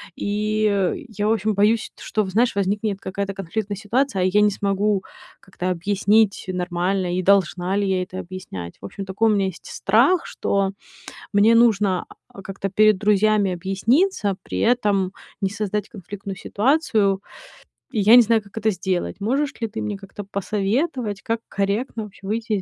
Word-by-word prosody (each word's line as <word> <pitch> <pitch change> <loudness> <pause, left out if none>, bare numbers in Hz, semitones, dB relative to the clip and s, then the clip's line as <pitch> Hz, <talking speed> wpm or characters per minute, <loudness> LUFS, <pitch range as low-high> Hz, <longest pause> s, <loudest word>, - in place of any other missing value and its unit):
И 210 - 0
я, 210 -1 -2
в - - +3
общем, 215 0 0
боюсь, 210 +3 +2
что, 215 -1 -1
знаешь, 225 +5 +1
возникнет 200 +1 -1
какая-то 195 +1 -3
конфликтная 195 +2 -4
ситуация, 220 +1 0
а - - +2
я 195 +3 +3
не 210 - +5
смогу 200 0 0 0.4
как-то 185 -1 -5
объяснить 200 +3 +2
нормально, 180 0 -1
и - - +1
должна 185 -1 +2
ли 205 - +1
я 190 -1 +1
это 185 0 -7
объяснять. 170 - -7
В - - -8
общем, 195 - -7
такой 210 +4 +1
у - - +3
меня 195 -1 +1
есть 185 - -8
страх, 250 - +2
что 195 -1 -1 0.6
мне 210 +3 +5
нужно, 210 -5 +3 0.3
э, 195 - -9
как-то 195 +1 -4
перед 215 +1 +4
друзьями 210 -1 +2
объясниться, 200 - +1
при - - -4
этом 205 -6 +2 0.3
не 195 - +1
создать 210 0 -3
конфликтную 200 -1 -8
ситуацию, 210 -5 +1 0.7
и 230 - -1
я 210 +3 +7
не 245 - +10
знаю, 225 0 +2
как 200 +1 -16
это 220 0 +1
сделать. 185 -1 -2
Можешь 270 +7 0
ли 225 - 0
ты 220 +1 -6
мне 205 -1 -3
как-то 195 +1 -9
посоветовать, 210 - -2
как 230 0 -2
корректно 210 +4 -1
вообще 200 -1 -12
выйти 220 +1 -2
из 200 - 0
200 Hz, 165 wpm, -22 LUFS, 190-215 Hz, 0.7 s, не